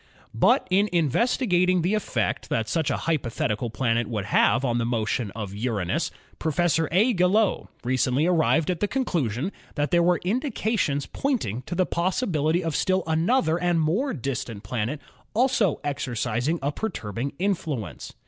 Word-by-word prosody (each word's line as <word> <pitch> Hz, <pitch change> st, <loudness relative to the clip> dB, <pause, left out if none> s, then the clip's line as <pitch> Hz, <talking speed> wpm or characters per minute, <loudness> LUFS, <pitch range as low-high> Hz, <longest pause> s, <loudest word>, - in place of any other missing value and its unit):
But -, -, +3 dB
in 200 Hz, +3 st, +3 dB
investigating 180 Hz, -, +2 dB
the 185 Hz, +5 st, +1 dB
effect 125 Hz, -, -1 dB
that 110 Hz, -1 st, 0 dB
such 160 Hz, +2 st, 0 dB
a -, -, 0 dB
hypothetical 120 Hz, -7 st, -1 dB
planet 115 Hz, +1 st, 0 dB
would 105 Hz, -4 st, -3 dB
have 120 Hz, +5 st, +3 dB
on 120 Hz, -1 st, +1 dB
the -, -, 0 dB
motion 115 Hz, -1 st, -1 dB
of 105 Hz, -3 st, -5 dB
Uranus, 105 Hz, -5 st, -1 dB, 0.3 s
Professor 165 Hz, 0 st, +1 dB
A. 215 Hz, +9 st, +4 dB
Gaillot 190 Hz, +3 st, +2 dB, 0.2 s
recently 130 Hz, +3 st, +1 dB
arrived 165 Hz, -1 st, +2 dB
at 175 Hz, -, -3 dB
the 205 Hz, -, +1 dB
conclusion 170 Hz, -, -1 dB, 0.2 s
that 145 Hz, -1 st, -1 dB
there 175 Hz, -1 st, +4 dB
were 175 Hz, +1 st, +3 dB
indications 215 Hz, -, 0 dB
pointing 220 Hz, -, -2 dB
to 175 Hz, -, -3 dB
the 185 Hz, +1 st, +2 dB
possibility 175 Hz, -, 0 dB
of 165 Hz, -2 st, -2 dB
still 185 Hz, -1 st, +1 dB
another 165 Hz, +3 st, +2 dB
and 175 Hz, -1 st, +1 dB
more 190 Hz, -, +1 dB
distant 125 Hz, -, -4 dB
planet 120 Hz, +7 st, -2 dB, 0.4 s
also 235 Hz, -, +2 dB
exercising 125 Hz, +1 st, -1 dB
a 140 Hz, -, +1 dB
perturbing 135 Hz, -, -4 dB
influence. 160 Hz, -, -3 dB
160 Hz, 150 wpm, -25 LUFS, 120-185 Hz, 0.4 s, A